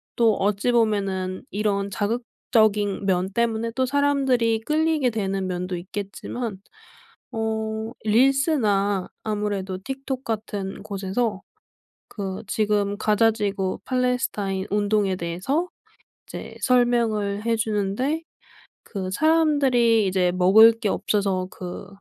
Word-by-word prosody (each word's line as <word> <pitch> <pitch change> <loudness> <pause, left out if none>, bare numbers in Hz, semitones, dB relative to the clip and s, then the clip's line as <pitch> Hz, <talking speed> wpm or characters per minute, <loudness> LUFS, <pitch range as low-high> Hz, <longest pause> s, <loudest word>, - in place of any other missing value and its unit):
또 230 -2 +4
어찌 205 +4 +1
보면은 195 -5 0
이런 200 -1 0
자극적인 210 -2 0
면 185 0 +1
때문에 230 -1 0
또 260 0 +2
사람들이 265 -5 +2
끌리게 305 -1 +1
되는 195 -3 -2
면도 180 0 -3
있겠지만 200 +4 -5 0.7
어 220 0 -2
릴스나 220 - +2 0.2
아무래도 205 -3 -2
틱톡 270 0 -4
같은 205 -4 -4
곳에서 200 +1 -2 0.7
그 195 -2 -5
지금 205 -1 0
가자 220 +1 +3
지구 200 -3 -2
팔레스타인 245 -7 -1
운동에 205 -2 +1
대해서 190 - -2 0.6
이제 - - -8
설명을 230 -5 +2
해 230 -1 +2
주는데 220 +8 -1 0.6
그 185 -2 -5
사람들이 270 -7 +3
이제 185 -1 +2
먹을 195 +5 +7
게 225 -2 -3
없어서 195 -3 0
그 180 +1 -7
215 Hz, 240 characters per minute, -24 LUFS, 195-240 Hz, 0.7 s, 먹을